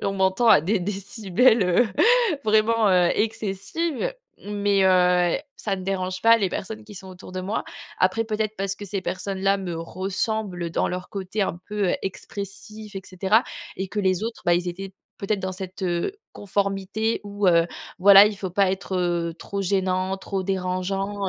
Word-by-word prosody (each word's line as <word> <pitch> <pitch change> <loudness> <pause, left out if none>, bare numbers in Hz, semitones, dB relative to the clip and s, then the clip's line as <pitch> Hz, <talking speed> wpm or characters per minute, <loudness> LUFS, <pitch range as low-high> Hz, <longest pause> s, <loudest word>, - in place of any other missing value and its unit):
on 195 - 0
m'entend 190 +4 +1
à 150 - +7
des 195 +7 +1
décibels, 200 +4 +2
heu, 180 +6 +3 0.6
vraiment, 220 0 +3
heu, 180 -2 +4
excessives. 225 - -2 0.3
Mais 205 -1 +1
heu, 180 0 +4 0.2
ça 200 -3 -2
ne 185 - -7
dérange 185 -1 -3
pas 230 0 +7
les 200 -4 0
personnes 215 +4 -6
qui 210 - -12
sont 190 0 -10
autour 185 0 -11
de 185 - -3
moi. 200 +4 -3 0.3
Après 190 +5 +2
peut-être 215 -1 -2
parce 195 0 -2
que 205 - -8
ces 200 0 -3
personnes-là 195 +1 -1
me 180 -3 -5
ressemblent 185 0 -3
dans - - 0
leur 180 0 -5
côté 195 +1 -3
un 180 - -2
peu, 205 -3 0
heu, - - +1
expressif, 200 +2 -7
et 195 - -5
cetera, 195 +5 +2 0.3
et 190 +1 -3
que 210 - -5
les 190 0 +1
autres, 225 0 -5
bah 175 - +4
ils 175 +1 0
étaient 195 +2 -6 0.3
peut-être 205 +1 -1
dans 190 0 -3
cette, 190 0 -7
heu, 175 - -1 0.2
conformité 200 +2 -1
où, 205 -1 -2
heu, 170 -1 +5 0.3
voilà 200 +1 +9
il 210 -1 -2
faut 190 -2 -5
pas 190 +1 +2
être, 190 -1 -4
heu, 170 -2 0
trop 200 0 -4
gênant, 190 0 0
trop 195 0 -4
dérangeant, 195 +2 -2
195 Hz, 180 wpm, -24 LUFS, 185-205 Hz, 0.6 s, voilà